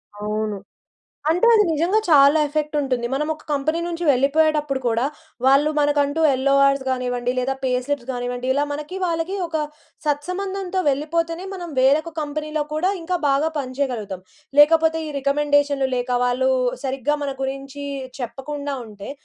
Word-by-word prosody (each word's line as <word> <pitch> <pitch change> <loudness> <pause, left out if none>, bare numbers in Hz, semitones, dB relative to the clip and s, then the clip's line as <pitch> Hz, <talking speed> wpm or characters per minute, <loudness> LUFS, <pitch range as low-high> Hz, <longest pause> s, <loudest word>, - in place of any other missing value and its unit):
అవును. 210 0 -3 0.7
అంటే 355 +8 +3
అది 430 -2 +6
నిజంగా 340 +7 +2
చాలా 285 0 +6
ఎఫెక్ట్ 300 +1 -2
ఉంటుంది. 255 -4 -1
మనం 295 +3 -1
ఒక 310 - -16
కంపెనీ 300 +3 0
నుంచి 345 0 -4
వెళ్ళిపోయేటప్పుడు 290 +1 +2
కూడా, 230 0 +1 0.4
వాళ్ళు 275 +3 +5
మనకంటూ 290 +1 +1
యెల్లోఆర్స్ 275 +1 +3
గానివ్వండి. 250 -1 -1
లేదా 260 +2 0
పే 260 - +1
స్లిప్స్ 285 -3 -3
గానివ్వండి. 245 0 -4
ఇలా 285 +2 +1
మనకి 300 +6 -6
వాళ్ళకి 335 +2 -1
ఒక 325 -1 -2 0.5
సత్సంబంధంతో 370 +5 -2
వెళ్ళిపోతేనే, 330 +5 -1
మనం 350 -3 -6
వేరొక 290 +5 +3
కంపెనీలో 305 +1 -3
కూడా 350 +5 +1
ఇంకా 360 +2 -1
బాగా 280 +3 +2
పనిచేయగలుగుతాం. 250 -8 -3 0.4
లేకపోతే 320 +2 +5
ఈ - - -5
రికమెండేషన్‌లు 285 -1 +2
లేక 245 0 -2
వాళ్ళు 255 +1 +1 0.4
సరిగ్గా 270 +2 0
మన 280 -1 -2
గురించి 275 +1 -5 0.4
చెప్పకుండా 275 +4 -4
ఉంటే, 205 -2 -10
285 Hz, 135 wpm, -22 LUFS, 260-315 Hz, 0.7 s, అది